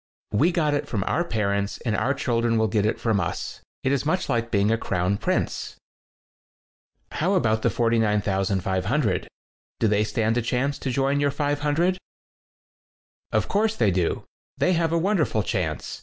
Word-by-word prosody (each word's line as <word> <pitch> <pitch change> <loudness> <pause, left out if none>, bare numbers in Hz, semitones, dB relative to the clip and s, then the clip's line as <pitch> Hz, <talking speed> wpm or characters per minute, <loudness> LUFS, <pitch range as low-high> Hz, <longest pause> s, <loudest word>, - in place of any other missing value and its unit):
We 155 - +3
got 155 -4 +1
it 145 - -1
from 105 -5 -1
our 170 - 0
parents, 100 -7 -1
and 110 -3 +1
our 130 +7 +1
children 115 -2 +1
will 110 0 +2
get 105 +1 +1
it - - -1
from 110 -4 +1
us. 85 - -4 0.2
It's 135 -1 +1
much 160 +4 -1
like 115 -2 0
being 105 -1 +2
a - - +4
crown 90 0 0
prince." - - -1 1.4
"How 185 +5 +1
about 110 -10 +2
the - - +2
49,500? 105 - +1 0.5
Do 110 - +3
they 105 0 +2
stand 110 +1 0
a - - +2
chance 130 +4 -1
to 135 - -3
join 135 +2 +1
your 145 0 +2
500?" 145 +5 0 1.3
*'0f - - +1
course 215 +2 +1
they 105 - +2
do. 90 -2 0 0.3
They 185 - +2
have 165 -1 +1
a 170 - +2
wonderful 165 - +1
chance. 90 -9 -3
115 Hz, 160 wpm, -24 LUFS, 105-145 Hz, 1.4 s, a